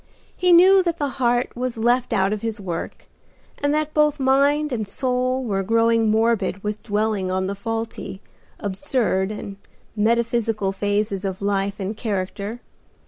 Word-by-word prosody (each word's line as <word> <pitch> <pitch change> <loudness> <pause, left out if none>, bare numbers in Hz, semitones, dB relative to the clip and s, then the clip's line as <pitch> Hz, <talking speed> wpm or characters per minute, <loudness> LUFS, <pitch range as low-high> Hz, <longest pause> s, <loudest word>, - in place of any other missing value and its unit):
He 360 0 +2
knew 375 +3 +7
that 340 -2 -1
the 290 -3 -1
heart 245 0 +1
was 250 -1 -3
left 240 +2 +1
out 195 +1 +2
of 210 - -4
his 225 -2 -3
work, 175 -4 -5 0.6
and 285 0 +1
that 305 0 -1
both 300 -1 +2
mind 280 +3 +3
and 220 -4 -2
soul 255 +3 -1
were 200 -5 -1
growing 230 +2 +2
morbid 220 -3 +1
with 210 0 -3
dwelling 210 -3 -1
on 185 0 0
the 195 - -2
faulty, 225 -1 -5 0.4
absurd 205 -2 0
and 205 -2 -7 0.4
metaphysical 225 -2 +1
phases 205 0 -1
of 190 -1 -3
life 200 0 -1
and 195 +2 -3
character. 205 +1 -4
225 Hz, 150 wpm, -22 LUFS, 200-255 Hz, 0.6 s, knew